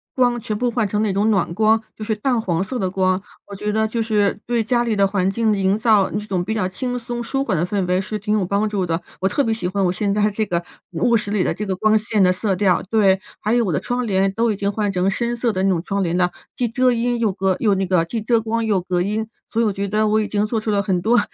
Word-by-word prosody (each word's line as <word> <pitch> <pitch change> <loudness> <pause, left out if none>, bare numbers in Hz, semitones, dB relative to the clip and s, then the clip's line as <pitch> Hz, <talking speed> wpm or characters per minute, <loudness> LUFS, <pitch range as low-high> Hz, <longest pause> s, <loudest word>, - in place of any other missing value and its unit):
光 245 -2 +2
全 215 -1 -3
部 245 +2 0
换 230 -2 0
成 210 +2 0
那 210 - +1
种 200 +3 +1
暖 195 -5 +1
光， 220 +3 +3
就 215 - -7
是 220 0 0
淡 245 +3 0
黄 180 -5 -1
色 250 +5 -4
的 190 - 0
光。 185 0 +1 0.3
我 205 - -10
觉 210 +2 -3
得 220 +1 +1
就 225 +1 -2
是 210 -2 +1
对 235 -1 0
家 240 +2 +1
里 225 -2 0
的 200 -1 +3
环 195 -1 +1
境 220 +2 +1
营 195 0 +1
造 215 -3 +3
一 210 - -2
种 190 -4 -1
比 200 +5 -2
较 210 -4 0
轻 245 +6 -3
松 240 0 -5
舒 270 +3 -1
缓 210 -9 -1
的 165 - +1
氛 195 0 -1
围 180 +1 +1
是 215 +3 -3
挺 210 +1 0
有 190 - 0
帮 200 +4 0
助 200 -3 -1
的。 165 0 -2 0.2
我 190 - +1
特 285 +8 +1
别 225 - 0
喜 220 -5 -3
欢 195 +2 -1
我 175 - +2
现 200 +2 -1
在 210 +1 +2
这 215 +2 -1
个 175 -3 -2 0.3
卧 190 +8 +2
室 205 -1 -4
里 205 -3 +1
的 - - 0
这 210 - -5
个 190 -2 -2
光 215 +3 +3
线 215 -1 +1
的 180 - +5
色 195 +1 0
调。 185 -1 +2
对， 195 -4 +3 0.2
还 215 - -1
有 240 -1 +2
我 180 - -1
的 - - +1
窗 245 -1 -2
帘 195 -1 +2
都 230 +4 0
已 - - -1
经 200 0 -1
换 205 0 -1
成 190 0 +1
深 235 +3 -1
色 235 0 0
的 185 - -2
那 195 - +3
种 170 -3 0
窗 200 +1 -2
帘 175 -2 0
了， 180 -1 +2 0.2
既 250 - 0
遮 255 +2 +2
音 240 +1 0
又 225 -3 +2
隔 190 -1 0
又 210 -4 +2
那 190 0 0
个 180 -2 +2
既 225 +6 -4
遮 230 +1 +2
光 225 +1 -1
又 210 -3 +2
隔 180 0 -1
音， 210 +4 -1 0.2
所 230 - 0
以 - - +3
我 210 - +1
觉 200 +1 -3
得 215 +2 +1
我 215 +1 +2
已 210 - -2
经 210 0 +1
做 220 0 -1
出 215 - -2
了 200 -1 +2
很 190 -3 0
多 235 +5 +3
210 Hz, 320 characters per minute, -21 LUFS, 190-225 Hz, 0.3 s, 的